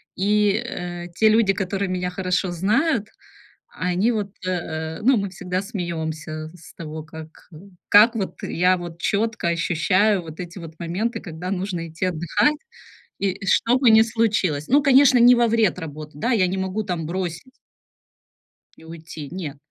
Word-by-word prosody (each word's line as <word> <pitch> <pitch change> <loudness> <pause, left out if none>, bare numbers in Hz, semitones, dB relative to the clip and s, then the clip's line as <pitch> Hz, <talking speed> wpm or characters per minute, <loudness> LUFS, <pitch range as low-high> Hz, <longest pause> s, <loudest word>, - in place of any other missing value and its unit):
и, 205 +1 +2
э, 175 -4 -6
те 220 -1 +4
люди, 215 -3 +4
которые 195 +1 -2
меня 180 0 -2
хорошо 185 0 -1
знают, 215 - +1 0.7
они 180 +6 +1
вот, 210 -3 -2 0.2
э, 160 -3 -3
ну, 255 +1 +4
мы 200 -1 -2
всегда 180 0 -3
смеёмся 160 -5 -5
с 170 - -15
того, 155 -1 -7
как, 160 0 -12
э, - - -13 0.3
как, 215 +4 +7
вот, 195 -4 -3
я 180 +2 +2
вот 170 -1 -8
чётко 220 -3 0
ощущаю 180 +4 +2
вот 160 -1 -11
эти 180 +1 -7
вот 165 -1 -11
моменты, 205 +7 -2
когда 175 +1 -7
нужно 180 -3 -3
идти 165 +3 -3
отдыхать, 175 - +1 0.6
и 195 -2 -1
что 235 +5 +3
бы 255 -3 +4
ни 220 0 +7
случилось. 210 -10 0
Ну, 285 +2 +4
конечно, 270 -2 +6
не 245 +1 +8
во 240 0 +3
вред 220 -5 +2
работы, 155 -2 -7
да, 240 +10 0
я 190 -5 +3
не 190 +1 -2
могу 190 +3 -2
там 175 -5 -3
бросить 175 +5 -4 1.3
и 160 - -16
уйти, 160 -2 -9
нет. 165 -6 -6
185 Hz, 160 wpm, -22 LUFS, 165-215 Hz, 1.3 s, не